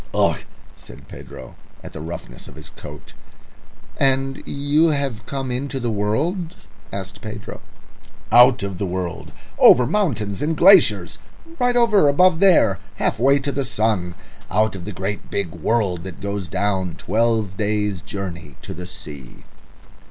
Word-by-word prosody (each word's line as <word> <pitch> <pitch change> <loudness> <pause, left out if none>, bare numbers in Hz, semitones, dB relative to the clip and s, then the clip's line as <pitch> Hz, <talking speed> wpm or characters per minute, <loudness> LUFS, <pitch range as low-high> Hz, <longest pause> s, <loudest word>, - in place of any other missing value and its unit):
"Ugh!" - - +2 0.4
said - - -13
Pedro, - - -11 0.3
at - - -10
the 80 - -7
roughness 85 +2 -8
of - - -13
his 80 - -11
coat. - - -11 0.8
"And 135 0 +1
you 145 +3 +2
have 140 -7 -1
come 135 -2 -4
into 135 +2 -3
the 120 -2 -2
world?" 150 - -1 0.4
asked 100 0 -7
Pedro. 110 -2 -8 0.7
"Out 120 -1 +6
of 100 -2 -5
the 100 - -1
world. 90 -2 -4 0.3
Over 125 - +7
mountains 120 - -1
and 155 +1 -1
glaciers; 120 - +5 0.4
right 245 -1 +2
over 225 -9 +4
above 165 +4 +4
there, 175 - +4 0.2
half - - -1
way 135 +3 +4
to 140 +1 -2
the 140 0 -2
sun. 110 -8 -1 0.3
Out 110 +1 +1
of 90 -2 -8
the 105 - -5
great 100 +1 -5
big 100 -5 -2
world 90 +1 -1
that 95 -3 -8
goes 100 -2 -4
down, 95 -1 -1
twelve 110 -1 0
days' 105 -2 -1
journey 85 -7 -7
to - - -7
the 90 +1 -8
sea." 70 -8 -10
110 Hz, 150 wpm, -21 LUFS, 95-140 Hz, 0.8 s, Over